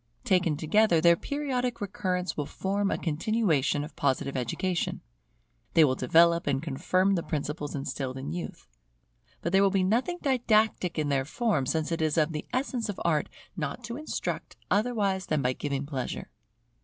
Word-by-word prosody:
Taken 180 - +2
together, 170 +3 +3
their 170 +1 +6
periodic 250 - -2
recurrence 185 -3 -2
will 145 -2 -3
form 200 +1 -1
a - - 0
continuation 160 - +1
of 150 - -9
Positive 140 0 0
education. 165 +9 -1 0.7
They 165 - +8
will 130 - +2
develop 170 +6 +4
and 135 -2 +2
confirm 185 +6 +1
the 175 - +1
principles 150 -1 -3
instilled 135 -1 -4
in 135 +3 -5
youth. 175 0 -6 0.8
But 170 - -1
there 195 +1 +5
will 200 - +5
be 190 -1 +1
nothing 245 - +1
didactic 220 - +2
in 150 -2 0
their 135 -1 +2
form; 160 - 0
since 160 +2 -1
it 165 - -1
is 155 0 +1
of 155 +1 +3
the 150 -1 -5
essence 250 -3 -1
of 205 - -4
Art 155 -3 +1 0.3
not 150 -4 -4
to 235 - -5
instruct 305 +3 -4 0.2
otherwise 205 -4 +1
than 150 -3 0
by 125 +1 +2
giving 140 0 -3
pleasure. 135 -4 -4
170 Hz, 170 wpm, -28 LUFS, 150-205 Hz, 0.8 s, They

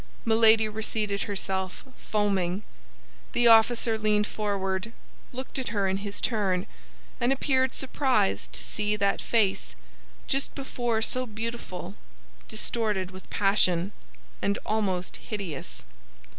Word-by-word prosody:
Milady 220 -1 +5
reseated 215 -1 -1
herself, 190 -2 -2
foaming. 200 -2 0 0.7
The 240 - +2
officer 225 0 +5
leaned 210 -1 +2
forward, 200 0 -2 0.4
looked 260 +1 -4
at 260 - -2
her 200 -3 +1
in 190 0 +1
his 200 0 -3
turn, 195 -6 +1 0.5
and 240 +2 +2
appeared 260 -1 +2
surprised 260 - +1
to - - -3
see 210 0 -1
that 200 -1 +1
face, 195 - +1 0.5
just 270 +1 -1
before 240 -5 -1
so 255 +2 +1
beautiful, 220 - -5 0.5
distorted 205 - 0
with 185 0 -12
passion 195 -2 +2 0.5
and 200 0 +1
almost 195 -4 -1
hideous. 155 - -6
210 Hz, 115 wpm, -27 LUFS, 190-230 Hz, 0.7 s, Milady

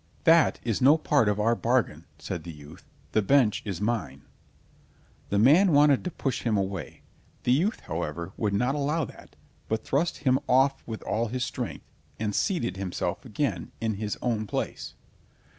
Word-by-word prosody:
"That 165 0 +5
is 115 -4 -1
no 140 +5 +6
part 145 -8 +2
of 105 0 0
our 115 +2 +3
bargain," 115 -10 0
said 85 +1 -5
the 85 - -7
youth, 75 +1 -14 0.2
"the 110 - +2
bench 115 0 +3
is 95 -5 -4
mine." 90 - -2 1.1
The 100 - 0
man 155 - +5
wanted 145 -1 +5
to 180 - -2
push 135 -6 -3
him 110 -3 +1
away; 95 -6 -4 0.4
the 125 - +2
youth, 175 - +1
however, 85 +2 -4
would 105 -2 -1
not 125 +6 +1
allow 150 +2 0
that, - - -14 0.3
but 110 - -2
thrust 160 +5 0
him 130 0 +4
off 135 +2 +3
with 110 -2 -6
all 115 +2 -1
his 125 +2 -2
strength, - - -5 0.3
and 105 -1 -2
seated 120 - -1
himself 90 -2 -3
again, 105 - -3
in 110 -1 -1
his 105 +1 -4
own 110 -3 -1
place. - - -4
115 Hz, 170 wpm, -27 LUFS, 95-135 Hz, 1.1 s, no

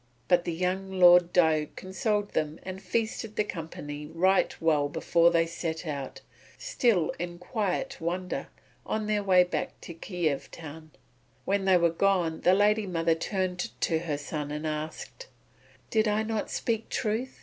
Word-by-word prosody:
But 175 -1 +3
the - - -1
young 185 +3 -2
Lord 175 -1 +7
Diuk 160 -4 +2
consoled 205 +2 -2
them 155 +1 -1
and 190 0 -7
feasted 220 +2 -2
the 210 - +2
company 150 -5 -7
right 185 +5 +2
well 150 -3 +2
before 165 +2 +3
they 165 -1 +3
set 165 0 -4
out, 140 -4 -5 0.4
still 235 - +1
in 175 0 -4
quiet 205 +5 -3
wonder, 180 +2 -3 0.4
on 215 0 -2
their 210 -1 +1
way 185 -2 +6
back 180 - -4
to 170 - -8
Kiev 165 -4 -2
town. 155 0 -10 0.6
When 195 0 0
they 190 -1 +5
were 170 -1 +3
gone 175 -2 +1
the 180 - +5
lady 210 +1 +3
mother 165 -2 +1
turned 180 +1 -2
to 160 -2 +1
her 160 -3 -3
son 145 0 -5
and 150 +1 -4
asked: 155 - -5 0.6
"Did 220 0 +3
I 210 +1 +1
not 220 -1 -2
speak 225 -1 -2
truth? 225 +5 -2
180 Hz, 160 wpm, -28 LUFS, 160-200 Hz, 0.6 s, Lord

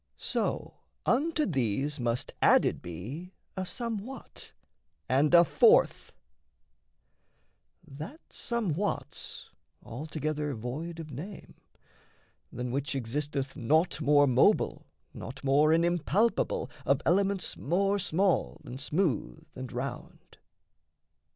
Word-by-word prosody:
So - - -2 0.3
unto 305 +4 +2
these 135 - -1
Must 120 0 -1
added - - +4
be 125 - -7 0.2
a 190 -1 -3
somewhat, 230 +4 -6 0.6
and 140 +4 +3
a 170 0 +8
fourth; 465 - +4 1.8
That 155 - -8
somewhat's 205 -5 -3 0.3
altogether 150 +3 -3
void 150 +9 -5
of 155 -2 -7
name; 170 +10 -8 1.0
Than 125 0 -4
which 140 +2 -2
existeth 135 +2 -2
naught 155 +3 +1
more 145 -1 +5
mobile, 130 -2 +3 0.3
naught 130 +4 -8
More 145 +3 +4
an 165 +1 +4
impalpable, 175 +6 +1
of 140 +2 +2
elements 195 +2 +2
More 195 +5 +1
small 175 - +1
and 130 +3 -7
smooth 160 - -1
and 130 -1 -6
round. 125 +1 -7
150 Hz, 100 wpm, -29 LUFS, 135-185 Hz, 1.8 s, a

